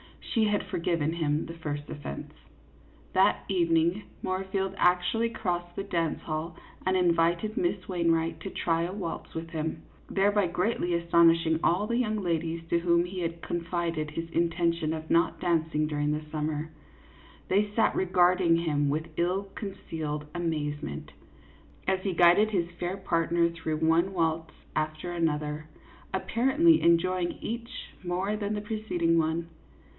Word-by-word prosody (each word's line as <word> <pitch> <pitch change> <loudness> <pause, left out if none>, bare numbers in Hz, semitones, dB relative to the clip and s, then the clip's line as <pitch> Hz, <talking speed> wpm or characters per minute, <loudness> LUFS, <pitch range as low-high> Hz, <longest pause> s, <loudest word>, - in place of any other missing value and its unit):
She 225 -3 0
had 210 -1 +1
forgiven 165 -2 0
him 155 -2 0
the 165 - -7
first 145 -3 -5
offence. 105 - -7 0.8
That 190 +1 +3
evening, 170 +1 +2 0.2
Moorfield 190 +1 -1
actually 180 +6 +2
crossed 175 -5 -3
the 195 - -3
dance 170 -5 -1
hall 155 +1 -4 0.3
and 185 0 +2
invited 175 +3 +2
Miss 350 - 0
Wainwright 165 -2 +1
to 195 - -6
try 165 -2 0
a 175 +2 -3
waltz 185 -5 -5
with 165 0 -4
him, 160 0 -3 0.3
thereby 205 0 +3
greatly 175 0 0
astonishing 165 -1 +4
all 180 +5 +3
the 235 +2 0
young 215 -4 0
ladies 165 -1 -1
to 170 - +3
whom 170 0 +3
he 185 +1 -6
had 165 -1 -3
confided 170 -2 -2
his 165 +2 -5
intention 170 -1 +1
of 160 0 -6
not 170 +1 +3
dancing 160 -3 +1
during 150 -1 0
the 150 - -2
summer; 155 0 -2 0.8
they 205 +2 +3
sat 225 - +3
regarding 180 -1 +3
him 150 -4 +1
with 155 +3 -1
ill 185 +3 0
concealed 160 -7 -5
amazement, 150 - -3 0.8
as 190 0 +2
he 190 -1 -1
guided 175 +5 +6
his 175 -5 -1
fair 180 +2 -2
partner 170 -2 +1
through 165 -2 -3
one 165 +4 +2
waltz 160 -2 0 0.2
after 155 +3 -2
another, 155 -2 -1 0.5
apparently 270 - +3
enjoying 175 +1 +3
each 235 +2 -5
more 185 +4 -1
than 210 0 -2
the 210 - -3
preceding 205 -6 0
one. 165 +1 -1
170 Hz, 145 wpm, -28 LUFS, 160-190 Hz, 0.8 s, guided